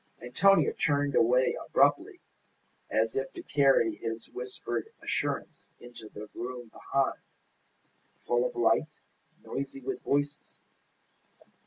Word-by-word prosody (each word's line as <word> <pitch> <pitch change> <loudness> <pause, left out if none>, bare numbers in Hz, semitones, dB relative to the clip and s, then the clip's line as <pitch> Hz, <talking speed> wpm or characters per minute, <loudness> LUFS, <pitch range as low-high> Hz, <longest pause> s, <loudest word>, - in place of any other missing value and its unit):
Antonia 185 +11 +4
turned 145 -1 +1
away 125 +2 +4
abruptly, - - +2 0.7
as 110 +1 +1
if 135 0 -2
to - - -8
carry 135 -6 +3
his 115 0 -5
whispered 125 -1 -5
assurance - - -3
into 120 -3 -11
the 105 +1 -9
room 120 -1 -6
behind, 135 +4 -1 1.1
full 120 0 +2
of - - -2
light, 120 +6 +1 0.4
noisy 135 0 -5
with 135 0 -4
voices. 145 +1 -2
125 Hz, 110 wpm, -29 LUFS, 115-140 Hz, 1.1 s, Antonia